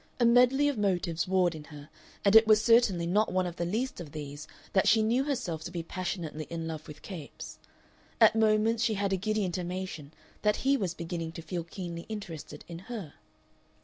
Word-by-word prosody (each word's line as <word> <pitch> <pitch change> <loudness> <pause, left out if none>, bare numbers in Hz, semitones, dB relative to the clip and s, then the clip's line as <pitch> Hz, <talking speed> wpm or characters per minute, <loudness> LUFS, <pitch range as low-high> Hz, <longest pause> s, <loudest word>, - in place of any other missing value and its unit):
A 240 - +4
medley 250 +4 +5
of 280 -6 -1
motives 180 -5 0
warred 180 -2 +2
in 155 -2 -9
her, 145 -1 -11 0.4
and 200 +2 +5
it 220 0 +8
was 215 -1 +6
certainly 220 -6 +4
not 205 +5 +2
one 185 0 +1
of 175 -1 -5
the 170 - -1
least 225 +2 -2
of 155 -3 -10
these 145 0 -7 0.3
that 190 - +3
she 220 -1 +5
knew 240 +5 +2
herself 235 - -2
to - - -5
be 170 -2 -4
passionately 170 -3 -4
in 165 -1 -4
love 155 -1 -6
with 150 - -11
Capes; 170 -8 -8 0.6
at 225 -1 +7
moments 220 +1 +3
she 225 -2 +1
had 200 -1 0
a - - +4
giddy 215 +2 0
intimation 180 -4 -4 0.3
that 210 0 +3
he 275 +1 +5
was 190 -9 -2
beginning 165 -1 -4
to 165 - -8
feel 175 0 -4
keenly 170 -1 -7
interested 165 -8 -7
in 170 -1 -7
her. 205 -11 -6
185 Hz, 200 wpm, -29 LUFS, 165-220 Hz, 0.6 s, it